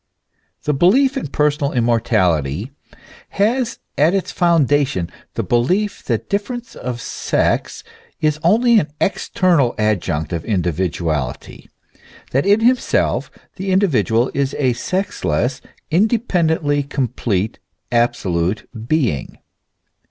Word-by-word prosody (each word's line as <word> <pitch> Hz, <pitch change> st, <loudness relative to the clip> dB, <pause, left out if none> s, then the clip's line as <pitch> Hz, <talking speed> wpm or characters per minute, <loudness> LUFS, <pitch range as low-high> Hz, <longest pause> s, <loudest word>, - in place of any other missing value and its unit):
The 150 Hz, -, 0 dB
belief 255 Hz, -, +4 dB
in 270 Hz, -, -3 dB
personal 145 Hz, 0 st, 0 dB
immortality 110 Hz, -, +1 dB, 0.7 s
has 235 Hz, +4 st, +1 dB, 0.2 s
at 160 Hz, +6 st, +4 dB
its 195 Hz, -, -1 dB
foundation 145 Hz, -, +2 dB, 0.2 s
the -, -, -1 dB
belief 185 Hz, -, 0 dB
that -, -, -1 dB
difference 235 Hz, +4 st, -3 dB
of 120 Hz, -1 st, -5 dB
sex -, -, -1 dB, 0.4 s
is 150 Hz, -1 st, +1 dB
only 225 Hz, +6 st, +4 dB
an 150 Hz, -, -2 dB
ex 195 Hz, -, -1 dB
ternal 165 Hz, -10 st, +2 dB
adjunct 90 Hz, -8 st, -1 dB
of 85 Hz, -1 st, -3 dB
individuality, 85 Hz, -, -2 dB, 0.6 s
that 135 Hz, +7 st, +1 dB
in 205 Hz, +2 st, +4 dB
himself 250 Hz, +2 st, +1 dB, 0.3 s
the 190 Hz, +1 st, -4 dB
individual 135 Hz, -, +2 dB
is 140 Hz, 0 st, -1 dB
a 130 Hz, -4 st, +2 dB
sexless, 130 Hz, -, -2 dB, 0.3 s
independently 170 Hz, -7 st, +2 dB
complete, 120 Hz, -7 st, -2 dB, 0.3 s
absolute 95 Hz, -5 st, 0 dB, 0.2 s
being. 125 Hz, -, 0 dB
140 Hz, 105 wpm, -19 LUFS, -, 0.7 s, belief